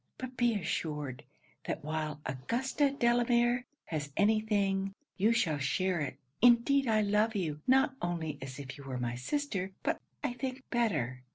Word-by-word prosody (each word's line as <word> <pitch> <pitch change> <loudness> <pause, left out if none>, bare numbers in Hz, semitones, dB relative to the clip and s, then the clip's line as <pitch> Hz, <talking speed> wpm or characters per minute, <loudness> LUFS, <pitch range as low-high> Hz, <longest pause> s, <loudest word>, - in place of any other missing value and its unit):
But 255 0 -6
be 240 -2 +2
assured, 150 -8 -3 0.4
that - - -3
while 155 -1 -3
Augusta 240 - 0
Delamere 240 -1 +2 0.2
has 145 -3 -3
any 215 +2 +4
thing, 195 -2 0 0.2
you 210 +4 +3
shall 160 -10 +2
share 175 +6 +1
it. 140 -2 -3 0.2
Indeed 245 +3 +5
I 215 -1 +4
love 210 +2 +2
you, 155 -6 -2
not 265 +1 +5
only 160 -4 -2
as 135 0 -6
if 140 -1 -8
you - - -9
were 130 -2 -4
my 120 -1 -2
sister, 195 - -2
but, - - 0 0.2
I 275 -4 0
think, 255 +1 -4
better. 150 - 0
200 Hz, 160 wpm, -32 LUFS, 150-240 Hz, 0.4 s, Indeed